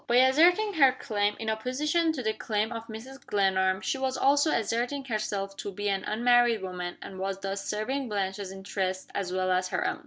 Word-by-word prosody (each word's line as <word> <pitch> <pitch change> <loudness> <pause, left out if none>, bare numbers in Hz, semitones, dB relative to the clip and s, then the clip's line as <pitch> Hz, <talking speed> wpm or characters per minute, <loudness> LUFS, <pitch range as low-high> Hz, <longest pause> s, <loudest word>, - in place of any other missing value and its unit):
By 240 - +2
asserting 335 +11 +5
her 275 -6 +6
claim, 205 -3 -1
in 225 - -6
opposition 295 +9 0
to 265 -5 -4
the 220 -1 0
claim 215 0 -1
of 230 -1 -6
Mrs. 250 +5 -9
Glenarm, 190 -1 +1
she 270 - -2
was 265 0 -1
also 285 +3 +4
asserting 245 +4 -1
herself 205 -4 -3
to 200 - -5
be 205 +2 -2
an 195 -1 -1
unmarried 240 -1 +3
woman, 180 -1 -5
and 190 - -9
was 195 0 -2
thus 195 0 -3
serving 255 +5 -2
Blanche's 195 -1 -2
interests 190 -1 -3
as 190 -3 -2
well 185 0 0
as 185 0 +1
her - - -1
own. - - -2
215 Hz, 195 wpm, -28 LUFS, 195-260 Hz, -, her